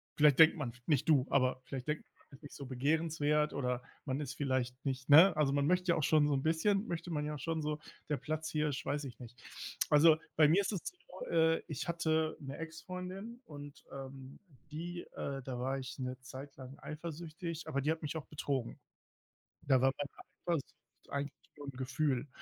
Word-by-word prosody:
vielleicht 150 Hz, -3 st, +6 dB
denkt 160 Hz, +2 st, +9 dB
man, 135 Hz, -7 st, -3 dB
nicht 150 Hz, 0 st, +2 dB
du, 140 Hz, -4 st, +5 dB
aber 130 Hz, -1 st, +3 dB
vielleicht 130 Hz, -1 st, -5 dB
denkt 150 Hz, +1 st, -1 dB
man, -, -, -39 dB, 0.2 s
man 135 Hz, -, -13 dB
ist 145 Hz, -, -31 dB
nicht 145 Hz, -, -10 dB
so 140 Hz, -, -7 dB
begehrenswert 150 Hz, +2 st, +1 dB
oder 125 Hz, -2 st, -1 dB, 0.2 s
man 135 Hz, -1 st, -1 dB
ist 145 Hz, -4 st, -4 dB
vielleicht 130 Hz, -2 st, -1 dB
nicht, 130 Hz, 0 st, -2 dB
ne 165 Hz, +5 st, +9 dB
also, 150 Hz, -3 st, +3 dB
man 140 Hz, 0 st, +2 dB
möchte 180 Hz, +3 st, +2 dB
ja 170 Hz, -, +5 dB
auch 155 Hz, -, 0 dB
schon 150 Hz, 0 st, +5 dB
so 145 Hz, -, +2 dB
'n 135 Hz, -, 0 dB
bisschen 195 Hz, +7 st, +2 dB
möchte 170 Hz, 0 st, -3 dB
man 150 Hz, -2 st, -1 dB
ja 150 Hz, -, -3 dB
auch -, -, -7 dB
schon 160 Hz, +3 st, -1 dB
so, 150 Hz, 0 st, -1 dB, 0.3 s
der 150 Hz, -, +1 dB
Platzhirsch, 150 Hz, +1 st, -2 dB
weiß 145 Hz, +1 st, -1 dB
ich 125 Hz, -3 st, -8 dB
nicht. 120 Hz, -1 st, -10 dB, 0.5 s
Also, 155 Hz, +1 st, +7 dB, 0.2 s
bei 155 Hz, -1 st, +7 dB
mir 170 Hz, +7 st, +5 dB
ist 200 Hz, -, -1 dB
das 195 Hz, -5 st, -2 dB
so, -, -, -8 dB
äh, 160 Hz, 0 st, +3 dB
ich 150 Hz, -, -4 dB
hatte 160 Hz, -2 st, +1 dB
'ne 140 Hz, -1 st, -7 dB
Exfreundin 185 Hz, +7 st, -6 dB
und, 145 Hz, -2 st, -10 dB
ähm, 135 Hz, 0 st, -8 dB, 0.3 s
die, 175 Hz, +3 st, -4 dB
äh 135 Hz, -1 st, -3 dB
da 125 Hz, -1 st, -4 dB
war 135 Hz, +2 st, -1 dB
ich 130 Hz, 0 st, -7 dB
'ne 130 Hz, 0 st, -3 dB
Zeit 135 Hz, +2 st, -9 dB
lang 130 Hz, +1 st, -9 dB
eifersüchtig, 160 Hz, +1 st, -6 dB
aber 140 Hz, -3 st, 0 dB
die 150 Hz, +3 st, +2 dB
hat 160 Hz, -, -2 dB
mich 150 Hz, +1 st, -3 dB
auch 155 Hz, -, -6 dB
betrogen. 140 Hz, -5 st, -2 dB, 0.8 s
Da 135 Hz, -2 st, +4 dB
war 135 Hz, 0 st, +5 dB
bei 145 Hz, -, -3 dB
der -, -, -14 dB, 0.3 s
Eifersucht 145 Hz, -5 st, -3 dB, 0.3 s
eigentlich 140 Hz, 0 st, -2 dB, 0.2 s
nur 145 Hz, -1 st, -8 dB
'n -, -, -3 dB
Gefühl, 130 Hz, +1 st, 0 dB
150 Hz, 205 wpm, -34 LUFS, 135-160 Hz, 0.8 s, denkt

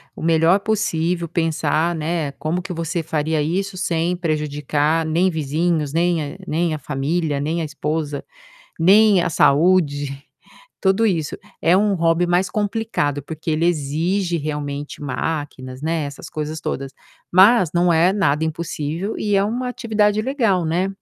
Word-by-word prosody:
O -, -, -8 dB
melhor 165 Hz, +3 st, +4 dB
possível 170 Hz, -5 st, -1 dB
pensar, 165 Hz, 0 st, 0 dB
né, 160 Hz, -2 st, -2 dB
como 155 Hz, +6 st, -2 dB
que 185 Hz, -1 st, -6 dB
você 165 Hz, +1 st, -3 dB
faria 155 Hz, 0 st, -1 dB
isso 185 Hz, +4 st, -2 dB
sem 175 Hz, -1 st, 0 dB
prejudicar 150 Hz, -1 st, 0 dB
nem 170 Hz, +4 st, +2 dB
vizinhos, 155 Hz, -1 st, -1 dB
nem 165 Hz, -3 st, 0 dB
a -, -, -12 dB
nem 165 Hz, +1 st, 0 dB
a 155 Hz, -, -4 dB
família, 145 Hz, +2 st, -1 dB
nem 160 Hz, +4 st, -1 dB
a 160 Hz, -, -2 dB
esposa, 150 Hz, -1 st, -3 dB, 0.6 s
nem 200 Hz, +3 st, +6 dB
a -, -, 0 dB
saúde, 145 Hz, -2 st, +2 dB, 0.6 s
tudo 195 Hz, +4 st, +3 dB
isso. 165 Hz, -7 st, -1 dB, 0.2 s
É 175 Hz, +2 st, +4 dB
um 205 Hz, 0 st, +2 dB
hobby 165 Hz, 0 st, +2 dB
mais 175 Hz, +2 st, +2 dB
complicado, 205 Hz, -9 st, -1 dB
porque 160 Hz, +3 st, -5 dB
ele 155 Hz, +2 st, +1 dB
exige 170 Hz, +4 st, 0 dB
realmente 145 Hz, -2 st, -4 dB
máquinas, 135 Hz, -2 st, -4 dB
né, 160 Hz, 0 st, -1 dB
essas 140 Hz, 0 st, -8 dB
coisas 155 Hz, +1 st, -4 dB
todas, 135 Hz, 0 st, -4 dB, 0.4 s
mas 190 Hz, 0 st, +6 dB
não 175 Hz, 0 st, +3 dB
é 170 Hz, +3 st, +4 dB
nada 160 Hz, -7 st, +1 dB
impossível 160 Hz, +4 st, -3 dB
e 210 Hz, -1 st, 0 dB
é 195 Hz, -, +4 dB
uma 240 Hz, +5 st, -2 dB
atividade 215 Hz, -3 st, +1 dB
legal, 225 Hz, -, +1 dB
né, 175 Hz, +4 st, 0 dB
165 Hz, 150 wpm, -21 LUFS, 150-185 Hz, 0.6 s, nem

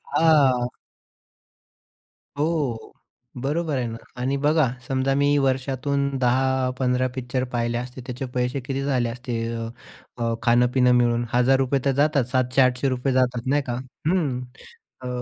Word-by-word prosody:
हां. 140 Hz, -7 st, +4 dB, 1.7 s
हो. 145 Hz, -7 st, -1 dB, 0.5 s
बरोबर 150 Hz, +3 st, -1 dB
आहे 125 Hz, -, -1 dB
ना. 115 Hz, -, -6 dB, 0.2 s
आणि 135 Hz, +2 st, 0 dB
बघा 155 Hz, -2 st, +4 dB, 0.2 s
समजा 135 Hz, 0 st, +1 dB
मी 145 Hz, +1 st, +3 dB
वर्षातून 135 Hz, +1 st, 0 dB
10-15 130 Hz, 0 st, +1 dB
पिक्चर 130 Hz, 0 st, -2 dB
पाहिले 120 Hz, 0 st, 0 dB
असते, 125 Hz, +1 st, -6 dB
त्याचे 125 Hz, +1 st, -4 dB
पैसे 125 Hz, +2 st, -1 dB
किती 135 Hz, +2 st, -3 dB
झाले 125 Hz, -4 st, 0 dB
असते? 120 Hz, 0 st, -5 dB, 0.2 s
अ, 115 Hz, 0 st, -4 dB, 0.5 s
अ, 115 Hz, -1 st, -1 dB
खाणं-पिणं 125 Hz, +1 st, +4 dB
मिळून 120 Hz, 0 st, +2 dB
₹1000 130 Hz, +2 st, +3 dB
तर 140 Hz, -, +3 dB
जातात, 145 Hz, -2 st, +3 dB
₹700-800 130 Hz, 0 st, +1 dB
जातात 125 Hz, -1 st, +1 dB
नाही 145 Hz, +2 st, +2 dB
का. 120 Hz, -, 0 dB, 0.4 s
अं, 150 Hz, -9 st, 0 dB, 0.6 s
अ, 125 Hz, -, -6 dB
130 Hz, 125 wpm, -24 LUFS, 125-140 Hz, 1.7 s, हां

